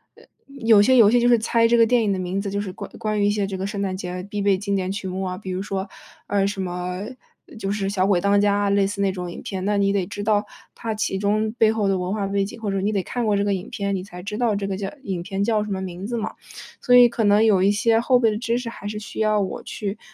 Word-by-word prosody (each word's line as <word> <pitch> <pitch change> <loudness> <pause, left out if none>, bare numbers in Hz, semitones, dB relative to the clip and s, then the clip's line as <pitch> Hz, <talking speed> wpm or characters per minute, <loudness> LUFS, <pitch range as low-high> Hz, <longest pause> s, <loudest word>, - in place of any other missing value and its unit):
呃 - - -19 0.2
有 230 -7 +4
些 260 +5 +4
游 215 -3 +7
戏 245 - +4
就 240 - +3
是 240 -1 +6
猜 230 +1 +2
这 235 +1 +3
个 230 - +6
电 240 0 +2
影 205 - +1
的 190 - 0
名 185 +2 -2
字， 200 - -4
就 200 +1 -2
是 190 -3 -4
关 - - -8
关 215 -1 -1
于 - - +3
一 - - +3
些 205 -1 0
这 195 0 -5
个 190 +1 -3
圣 200 0 -5
诞 190 -1 -2
节 185 -1 -5
啊 180 0 -5
必 205 0 -4
备 200 -1 +3
经 200 +1 -2
典 190 -1 -1
曲 200 -1 -4
目 185 +1 -4
啊。 185 0 -3
比 190 -3 -7
如 185 +1 -3
说， 195 -1 -3 0.4
呃， 200 -1 +1
什 200 -1 -4
么， 180 +1 -4 0.6
就 195 -1 -2
是 205 -1 -2
《小 190 -1 +2
鬼 195 -3 +3
当 200 +2 +3
家》， 205 0 +2
类 200 -1 +3
似 200 0 -4
那 195 -1 +2
种 180 -2 -5
影 - - -8
片， 190 -1 -4
那 205 0 +1
你 200 0 +2
得 190 -3 0
知 205 0 -6
道， 210 -1 +2 0.3
它 225 -2 -4
其 200 -2 -1
中 215 +2 +1
背 220 -1 +5
后 215 -3 0
的 190 -1 +1
文 180 +1 -3
化 210 -2 -1
背 200 0 0
景， 215 +4 -7
或 210 -3 -3
者 195 - -1
你 205 +2 0
得 200 -3 -1
看 245 +6 -3
过 210 -2 +2
这 200 - +1
个 205 - +1
影 185 0 -5
片， 200 -1 -2
你 185 - -4
才 180 -2 -10
知 210 +1 -5
道 235 -4 +2
这 200 -1 -2
个 195 - -2
叫 195 0 -4
影 185 -8 -3
片 195 +2 -3
叫 215 0 +1
什 210 - -7
么 190 - -2
名 185 +1 -6
字 240 +1 -3
嘛。 220 - -3 0.5
所 245 - +4
以 245 -1 +9
可 235 -1 -2
能 205 +2 +4
有 200 -4 +4
一 200 +1 +4
些 225 +2 +2
后 250 +1 +3
备 230 -2 +3
的 210 - -2
知 235 0 0
识 245 -1 -5
还 205 -3 -8
是 210 0 -4
需 215 - -8
要 215 -1 +2
我 190 - -4
去 205 +1 -5
200 Hz, 330 characters per minute, -23 LUFS, 195-215 Hz, 0.6 s, 以